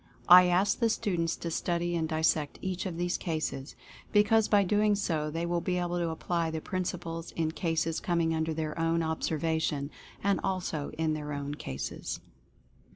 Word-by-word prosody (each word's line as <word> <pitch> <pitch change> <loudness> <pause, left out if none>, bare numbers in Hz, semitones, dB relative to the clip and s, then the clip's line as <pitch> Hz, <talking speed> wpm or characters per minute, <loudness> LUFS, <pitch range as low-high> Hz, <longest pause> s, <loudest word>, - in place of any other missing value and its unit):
I 180 0 +10
ask 185 +3 +2
the 230 - +3
students 175 -7 0
to 170 - -5
study 175 +1 -1
and 160 -1 -1
dissect 155 -2 +1
each 185 0 -2
of 170 -3 -5
these 175 +1 -1
cases, 155 -5 -3 0.4
be 210 -1 +6
cause 220 0 +3
by 205 -1 +4
so - - -3
doing 200 -7 +1
they 165 +2 -2
will 170 0 0
be 180 0 -1
able 175 0 -1
to 170 -1 0
apply 165 +1 -1
the 160 0 -3
prin 185 +3 -3
ciples 165 -2 -4
in 160 -1 0
cases 165 -1 -1
[coming 170 -2 +1
under 160 0 0
their 155 0 -3
own 165 0 +2
observation, 160 -2 -1 0.3
and 200 -1 +2
also 180 -6 -2
in 160 -1 +1
their 150 -1 -4
own 145 0 -3
cases. 65 - -5
165 Hz, 180 wpm, -30 LUFS, 160-180 Hz, 0.4 s, I